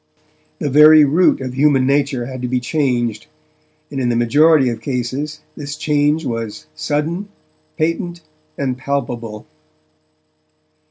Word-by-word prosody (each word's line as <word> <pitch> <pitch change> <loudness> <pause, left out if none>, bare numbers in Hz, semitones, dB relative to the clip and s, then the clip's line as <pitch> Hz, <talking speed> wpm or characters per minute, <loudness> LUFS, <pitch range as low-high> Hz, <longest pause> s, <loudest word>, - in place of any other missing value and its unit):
The 145 - -3
very 150 +1 +8
root 155 +2 +3
of 130 -1 -5
human 135 -1 +3
nature 140 -2 0
had 130 0 -7
to 125 - -2
be 125 +1 0
changed, 125 -5 -1 0.6
and, 135 - -4
in 125 -2 0
the 120 - +1
majority 145 +5 +4
of 115 -2 -5
cases, 135 +5 -4
this 145 0 -6
change 150 0 +1
was 115 -5 -5
sudden, 160 - -2 0.5
patent, 170 +2 -2 0.4
and 130 -2 -2
palpable. 120 -6 -4
140 Hz, 125 wpm, -18 LUFS, 125-150 Hz, 0.6 s, very